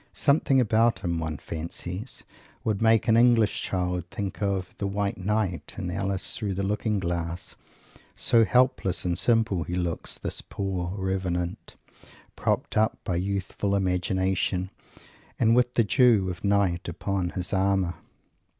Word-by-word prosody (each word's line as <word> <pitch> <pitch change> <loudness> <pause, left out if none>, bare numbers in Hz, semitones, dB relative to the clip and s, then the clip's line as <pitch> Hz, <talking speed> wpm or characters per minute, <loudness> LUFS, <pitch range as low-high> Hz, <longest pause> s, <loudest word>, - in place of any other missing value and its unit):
Something 140 -2 +3
about 115 0 +3
him, 85 -3 -1
one 80 -2 -3
fancies, 90 - -6 0.4
would 110 -2 -1
make 110 0 +4
an 110 - +5
English 115 -3 +4
child 90 -1 -1
think 100 +1 -5
of 100 -2 -1
the 100 - -1
"White 100 0 -2
Knight" 95 -5 -1
in 90 - -3
Alice 100 0 -2
Through 100 -4 -3
the 100 - -2
Looking 105 +2 0
Glass, 85 -1 -3 0.6
so 115 -1 +4
helpless 110 -7 +2
and 90 -1 +1
simple 110 -2 +2
he 85 +3 -3
looks, 90 -2 -2
this - - -3
poor 95 -2 -3
"Revenant," 95 -2 -2 0.6
propped - - -1
up 110 +1 +2
by 90 - -1
Youthful 100 +1 -1
Imagination, 95 0 0 0.7
and 115 +1 +4
with 125 0 +2
the 115 - +4
dews 110 -4 +4
of 90 - -9
night 100 -3 +1
upon 95 +1 -2
his 90 +1 -1
armour. 95 -2 +2
95 Hz, 140 wpm, -26 LUFS, 90-105 Hz, 0.7 s, an